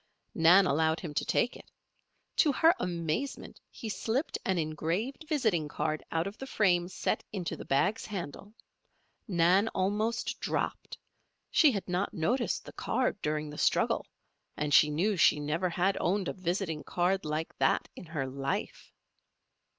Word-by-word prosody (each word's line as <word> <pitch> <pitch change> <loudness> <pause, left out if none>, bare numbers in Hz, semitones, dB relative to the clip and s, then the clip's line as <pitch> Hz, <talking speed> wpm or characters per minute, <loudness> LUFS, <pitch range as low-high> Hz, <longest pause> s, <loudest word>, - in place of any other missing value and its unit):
Nan 175 +4 +6
allowed 160 +1 +2
him 160 -5 -6
to - - 0
take 245 - +1
it. - - -14 0.7
To 305 - +5
her 325 +5 +5
amazement 170 - -3
he 230 - -8
slipped 230 +7 -2
an 190 -1 0
engraved 170 - -2
visiting 220 - +1
card 155 +1 -2
out 165 +1 0
of 200 +2 -7
the 270 - -6
frame 180 -7 +2
set 185 - -2
into 190 -4 -3
the - - -9
bag's 190 +11 +1
handle. 200 +1 -7 0.7
Nan 185 +2 +3
almost 210 +5 -1
dropped. - - -3 0.5
She 305 -4 +6
had 200 -5 -4
not 180 +4 -1
noticed 235 +10 0
the - - -10
card 255 -5 -1
during 150 0 -2
the 150 - -8
struggle - - +2 0.5
and 150 -1 -1
she 150 - +7
knew 185 +7 +1
she 155 - +5
never 160 +5 -1
had 185 +3 +1
owned 190 +1 +1
a - - -2
visiting 175 -3 -2
card 180 +2 0
like 155 +1 -3
that - - +2
in 175 - -10
her 155 -4 -3
life. 135 +1 -4
180 Hz, 155 wpm, -30 LUFS, 160-210 Hz, 0.7 s, she